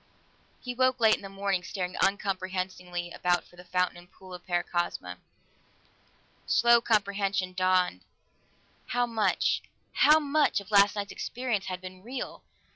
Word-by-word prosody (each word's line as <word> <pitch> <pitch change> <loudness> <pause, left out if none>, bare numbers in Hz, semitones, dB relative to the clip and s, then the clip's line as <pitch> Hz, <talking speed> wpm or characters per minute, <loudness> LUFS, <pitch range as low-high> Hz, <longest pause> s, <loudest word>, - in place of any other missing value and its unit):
He 250 - -5
woke 255 0 +2
late 220 -2 +5
in - - -12
the 195 - -8
morning, 195 -1 -1
staring 180 -2 -4
uncomprehendingly 185 -3 -2
about 175 0 0
for - - -21
the 180 - -13
fountain 180 0 0
and 175 0 -15
pool 185 -1 -13
of 180 - -9
Paracosma. 175 - -2 1.3
Slow 235 0 +5
comprehension 200 -4 0
dawned; 185 - +1 0.9
how 245 0 +1
much 215 -6 +1 0.3
how 305 +1 +6
much 295 -4 +2
of 200 +1 -13
last 200 0 +5
night's 205 -1 -4
experience 235 -6 -3
had 185 -1 -4
been 185 0 -10
real? 250 +6 -6
195 Hz, 140 wpm, -28 LUFS, 180-220 Hz, 1.3 s, how